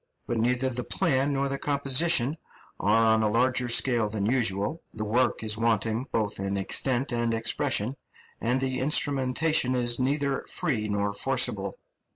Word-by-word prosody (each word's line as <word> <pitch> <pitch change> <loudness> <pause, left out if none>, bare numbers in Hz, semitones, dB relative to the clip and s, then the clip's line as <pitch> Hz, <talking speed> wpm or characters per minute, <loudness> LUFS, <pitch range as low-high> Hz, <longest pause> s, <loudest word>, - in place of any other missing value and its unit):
But 120 - -2
neither 125 +3 +1
the 125 0 -4
plan 140 -5 +1
nor 140 0 0
the 140 0 -4
composition 140 0 +1 0.4
are 110 +2 +3
on 110 - +2
a 110 - +1
larger 125 +2 +1
scale 120 -2 +3
than 105 -2 -2
usual; 110 - 0
the 110 -1 -5
work 120 +2 0
is 110 0 -1
wanting 115 +2 0
both 105 -3 -1
in 100 0 -2
extent 125 +6 0
and 120 -1 0
expression, 120 +1 0 0.5
and 125 +3 +1
the 130 -1 -2
instrumentation 135 0 +1
is 120 -1 0
neither 140 +1 -1
free 110 -8 -1
nor 100 0 -1
forcible. 100 - 0
120 Hz, 155 wpm, -26 LUFS, 110-135 Hz, 0.5 s, are